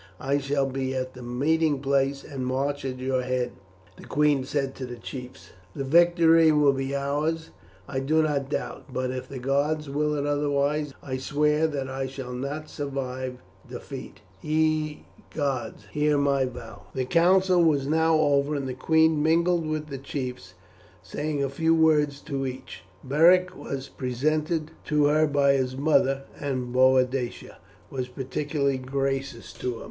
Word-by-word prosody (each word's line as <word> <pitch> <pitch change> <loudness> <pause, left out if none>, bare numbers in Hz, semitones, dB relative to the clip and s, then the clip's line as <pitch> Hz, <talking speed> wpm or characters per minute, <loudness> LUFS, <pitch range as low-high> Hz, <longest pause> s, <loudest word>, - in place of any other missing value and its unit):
"I 140 +1 0
shall 140 0 0
be 135 0 -2
at 130 0 -3
the 125 - -11
meeting 145 +5 +1
place 140 0 0
and 135 -3 -6
march 135 +3 -1
at 130 -1 -3
your 130 0 0
head," 125 -1 -1 0.5
the - - -12
queen 145 -2 +2
said 135 -1 -1
to 130 - -5
the 120 - -7
chiefs; 125 +2 -9 0.2
"that 135 - -3
victory 165 +1 +5
will 150 -2 +4
be 135 +1 -2
ours 150 +4 -1 0.4
I 130 - -2
do 155 +4 +2
not 140 -3 -1
doubt; - - -4
but 130 0 -2
if 130 0 -6
the 135 - -6
gods 140 +3 0
will 150 +1 0
it 145 -1 -1
otherwise 145 0 0
I 130 -2 -3
swear 150 +3 +1
that 140 -4 -3
I 135 0 -3
shall 130 -1 -7
not 140 +5 -4
survive 130 -3 -5 0.3
defeat. - - -8 0.2
Ye 155 -1 0 0.3
gods, 130 -8 -2
hear 150 +2 +2
my 140 -1 +2
vow." 125 -2 -9
The 130 -1 -1
council 180 +4 +4
was 145 -4 +3
now 160 +2 +3
over, 145 -1 +2
and 140 -2 -2
the 130 - -3
queen 160 +3 +3
mingled 170 +1 +2
with 155 0 -3
the 135 -2 -5
chiefs, 125 -9 -6 0.5
saying 145 - -2
a - - +1
few 160 +4 +1
words 150 -3 +3
to 135 -3 -3
each. 130 0 -8 0.2
Beric 180 +6 +4
was 135 -5 -5
presented 155 +5 -1
to 150 -1 +2
her 155 +2 +4
by 140 -1 +3
his 130 -1 -1
mother, 135 -2 +2 0.2
and 130 -3 -3
Boadicea 130 -1 +2 0.3
was 130 -2 -3
particularly 140 +2 -2
gracious 135 -1 -3
to 125 -1 -3
him. - - -9
140 Hz, 160 wpm, -26 LUFS, 130-150 Hz, 0.5 s, victory